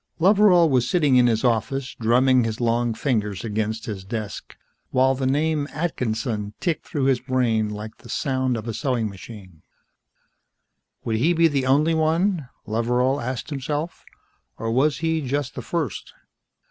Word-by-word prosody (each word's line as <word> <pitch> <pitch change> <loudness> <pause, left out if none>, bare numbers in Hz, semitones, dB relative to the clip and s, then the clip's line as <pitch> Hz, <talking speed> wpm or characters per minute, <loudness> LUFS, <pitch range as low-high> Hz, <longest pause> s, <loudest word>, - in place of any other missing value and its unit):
Loveral 185 -1 +5
was 125 -4 +1
sitting 150 -6 +3
in 125 -1 +5
his 110 -2 +1
office, 130 +3 0
drumming 125 +2 +4
his 110 -1 -3
long 120 -1 +1
fingers 105 -7 -1
against 110 0 -2
his 100 -4 -5
desk 105 0 -6 0.3
while 130 +1 +3
the 130 0 -2
name, 150 +1 +1
Atkinson, 115 -9 -3
ticked 170 -3 -2
through 145 - -2
his 130 -2 +3
brain 120 -4 0
like 105 +1 -7
the - - -15
sound 130 -3 -1
of 110 +1 -7
a 115 - -3
sewing 120 -3 -1
machine. 95 -4 -12 1.4
Would 110 -1 -1
he 160 +10 +3
be 165 0 +4
the 140 -4 -1
only 150 +5 +3
one, 160 -1 +1 0.2
Loveral 125 +5 0
asked 125 +4 -4
himself, 145 +4 -4 0.5
or 115 +1 -3
was 140 +5 +2
he 160 -1 +1
just 140 0 -2
the - - -6
first? 160 - -4
130 Hz, 155 wpm, -23 LUFS, 110-145 Hz, 1.4 s, Loveral